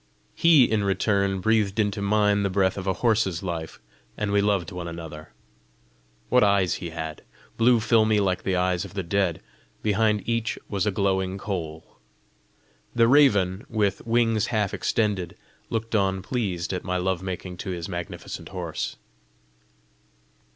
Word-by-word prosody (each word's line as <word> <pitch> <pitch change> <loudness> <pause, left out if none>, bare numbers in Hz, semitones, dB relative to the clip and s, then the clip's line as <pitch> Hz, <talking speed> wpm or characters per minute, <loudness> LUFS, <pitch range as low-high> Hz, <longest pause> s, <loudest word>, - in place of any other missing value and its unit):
He 165 -5 +6
in 110 -3 +1
return 100 -1 +1
breathed 110 -1 +1
into 105 -1 0
mine 105 0 +2
the 100 - 0
breath 95 0 +1
of 95 -1 -6
a 95 - +2
horse's 105 -7 +2
life, 85 -3 -5 0.4
and 105 -1 -1
we 100 0 +3
loved 100 -3 0
one 90 -2 -5
another. 80 -2 -8 1.0
What 125 -1 +5
eyes 100 -4 +3
he 85 - -4
had! 80 -2 -6 0.3
Blue 120 +1 +4
filmy 110 -1 +3
like 95 -2 0
the 95 - -1
eyes 90 -1 +1
of - - -10
the 95 - -2
dead, 90 -1 0 0.4
behind 105 0 +1
each 115 -1 -1
was 100 -2 -1
a - - +2
glowing 95 -1 0
coal! 85 -6 -6 1.0
The 115 -1 +5
raven, 105 -9 +4
with 105 -3 0
wings 115 -1 +2
half 105 -4 0
extended, 105 -6 -1 0.3
looked 115 0 -3
on 95 -3 +1
pleased 95 -7 -2
at 90 - -3
my 90 -1 -1
love 90 0 -1
making 90 -1 -5
to 95 - -6
his 85 -2 -4
magnificent 85 -2 -6
horse. - - -4
100 Hz, 150 wpm, -25 LUFS, 90-110 Hz, 1.0 s, He